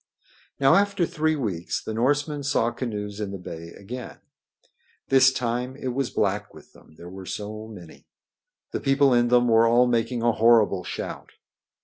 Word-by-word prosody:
Now 135 -1 +5
after 200 -3 +2
three 155 0 0
weeks 100 - -3
the 110 - -5
Norsemen 145 +5 0
saw 135 -4 +1
canoes 105 -4 -5
in 105 -2 -3
the 100 - -6
bay 85 -2 -8
again. 120 +5 -8 0.9
This 130 0 +6
time 125 0 -3
it 130 -2 -4
was 130 0 -2
black 105 0 -2
with - - -16
them, 80 - -20
there 85 - -11
were 95 +1 -10
so 110 +1 -6
many. 90 -7 -13 0.6
The - - -2
people 135 -1 +3
in 120 0 +3
them 120 0 +3
were 115 0 +5
all 120 +2 +4
making 115 0 0
a 120 - +4
horrible 110 -5 +3
shout. - - -7
120 Hz, 165 wpm, -24 LUFS, 105-130 Hz, 0.9 s, This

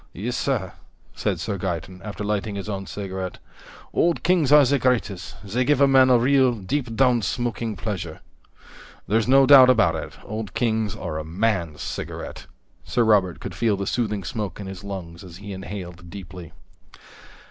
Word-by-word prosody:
"Yes, 120 +7 -3
sir," 120 -11 -1 0.4
said - - -2
Sir 100 - -3
Gaeton, 90 0 -4
after 105 0 -6
lighting 105 0 -2
his 100 0 -5
own 95 -2 -4
cigarette, 95 -2 -5 0.6
"Old 170 0 +1
Kings 170 -6 +3
are 150 -1 +8
the 140 +2 +2
greatest. 100 -8 -1
They 110 +6 -1
give 145 +1 +2
a 140 - +6
man 130 -1 +6
real, 130 0 +4
deep 115 +4 -3
down 125 -1 +3
smoking 115 +2 -2
pleasure." 90 -5 -5 0.9
"There's 110 +2 +1
no 135 +1 +6
doubt 130 -2 +9
about 115 -4 +4
it, - - -6
Old 110 -2 -6
Kings 110 -3 0
are 80 -7 -4
a - - -4
man's 85 -2 -1
cigarette." - - -6 0.4
Sir 120 - +1
Robert 100 -6 +3
could 95 - -6
feel 100 +4 +1
the 100 - -3
soothing 105 -3 -1
smoke 105 +2 -4
in 100 - -6
his 95 -1 -8
lungs 90 -4 -7
as 90 -2 -11
he 100 +1 -8
inhaled 90 -2 -8
deeply. 90 -3 -9
105 Hz, 170 wpm, -23 LUFS, 95-125 Hz, 0.9 s, doubt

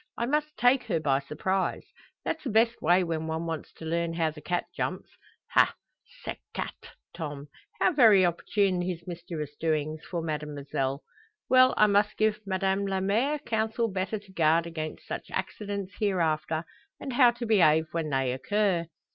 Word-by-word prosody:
I 235 - 0
must 300 +3 -1
take 245 +1 +4
her 170 -7 0
by 140 -3 +2
surprise. 185 +7 -2 0.4
That's 320 - -2
the 270 - -3
best 230 +2 +2
way 180 +1 +4
when 160 -2 -2
one 160 +1 -2
wants 160 -2 -4
to 160 - -10
learn 170 +1 -1
how 165 -2 +1
the 150 0 -12
cat 175 +3 -1
jumps. - - -3 0.4
Ha! - - +4 0.5
cette - - -5 0.2
chat - - -3 0.4
Tom; 145 -3 -6 0.3
how - - +4
very 220 -9 +7
opportune 180 +2 +1
his 175 -1 -4
mischievous 170 -4 -6
doings 155 -1 -1
for 170 -2 -4
Mademoiselle! 145 -3 -3 0.5
Well, 255 0 +6
I 215 - +7
must 205 0 +2
give 215 0 +2
Madame 195 +1 0
la 190 -1 0
mere 225 +10 +1
counsel 225 -2 -1
better 190 +3 -2
to 200 -2 -15
guard 165 -1 +3
against 155 -2 -6
such - - -6
accidents 200 -2 -4
hereafter; 165 -6 0 0.4
and 270 - -5
how 245 -1 +7
to 240 0 -5
behave 160 -8 +4
when 165 -2 -2
they 135 -2 +1
occur." 185 +3 0
180 Hz, 165 wpm, -28 LUFS, 160-215 Hz, 0.5 s, very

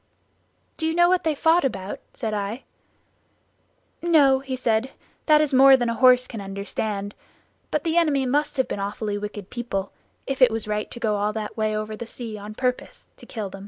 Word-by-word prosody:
"Do 320 - -1
you 320 - -1
know 345 0 +5
what 365 0 +2
they 315 -2 0
fought 325 +4 +3
about?" 195 -7 -3 0.2
said 220 -3 -3
I. 210 +4 -3 1.4
"No," 290 -6 +4
he 265 -1 -5
said, 240 0 0 0.4
"that 305 -1 +6
is 300 -2 0
more 270 +1 +8
than 240 -2 -1
a - - 0
horse 250 +1 +5
can 225 -4 -7
understand, 200 +1 -4 0.6
but 305 - -1
the 330 0 0
enemy 295 -6 +2
must 290 +3 0
have 260 - +1
been - - -4
awfully 205 +1 -3
wicked 205 -2 -7
people, 200 -5 -4 0.3
if 270 -1 -4
it 255 - +8
was 225 -1 -2
right 210 0 -2
to - - -9
go 215 -3 0
all 205 +1 0
that 215 -1 -5
way 215 -1 0
over 215 0 -4
the 230 +2 -7
sea 230 -2 -6
on 210 +1 -9
purpose 250 0 -3
to - - -15
kill 210 -5 -5
them." 195 - -9
235 Hz, 200 wpm, -24 LUFS, 210-270 Hz, 1.4 s, more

